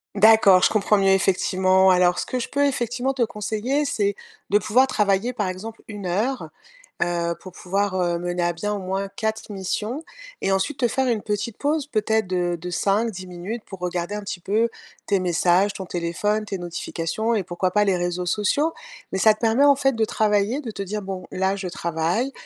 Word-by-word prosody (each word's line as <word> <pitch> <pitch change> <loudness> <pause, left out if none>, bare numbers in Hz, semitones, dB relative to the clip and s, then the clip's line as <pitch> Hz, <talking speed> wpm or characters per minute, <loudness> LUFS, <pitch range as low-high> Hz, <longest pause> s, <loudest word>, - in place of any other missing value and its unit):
D'accord, 200 -3 +6
je - - +6
comprends 210 0 +2
mieux 195 -1 +3
effectivement. 190 0 +3
Alors 180 -1 +4
ce - - -2
que 255 - -2
je - - -3
peux 285 0 +1
effectivement 250 0 -1
te 255 -3 +1
conseiller 230 +6 -1
c'est, 205 -8 0 0.3
de 205 - +5
pouvoir 255 +6 +3
travailler 210 +2 +1
par 205 -5 -1
exemple 215 +5 -7
1 205 -3 -7
heure, 220 +9 -1 0.5
heu, 170 -1 -1
pour 185 - -10
pouvoir, 195 +2 -1
heu, 175 -1 +1
mener 175 0 -2
à 175 0 +1
bien 210 +5 -3
au 205 - -3
moins 195 +1 -3
4 220 +1 -3
missions, 210 - -3 0.4
et 195 - +1
ensuite 265 +9 -1
te 240 - +3
faire 265 +3 0
une 225 -4 +1
petite 210 +1 -3
pause 295 0 0
peut-être 220 -4 0
de 175 -1 0
de 180 - -6
5-10 195 +2 0
minutes 185 +6 -6
pour 195 -2 -10
regarder 180 +2 -3
un 210 - -4
petit 200 -2 -5
peu 220 +6 +1 0.4
tes 200 -2 +2
messages, 180 +2 +2
ton 190 - -6
téléphone, 180 +6 -1
tes 195 -2 -4
notifications 175 +5 -2
et 200 - 0
pourquoi 180 +1 -1
pas 210 +1 +3
les 195 -3 +2
réseaux 175 0 -2
sociaux, 215 - +1 0.4
mais 190 - -1
ça 215 +2 +6
te 215 - -17
permet 230 +5 +4
en 285 - +6
fait 270 -1 +2
de 220 - +3
travailler, 215 +6 +1
de 230 -5 -6
te 200 - -6
dire: 210 +2 -4
«Bon, 190 -2 -6
là 190 +1 0
je 190 -2 -4
travaille, 170 +9 -1
200 Hz, 205 wpm, -23 LUFS, 180-225 Hz, 0.5 s, D'accord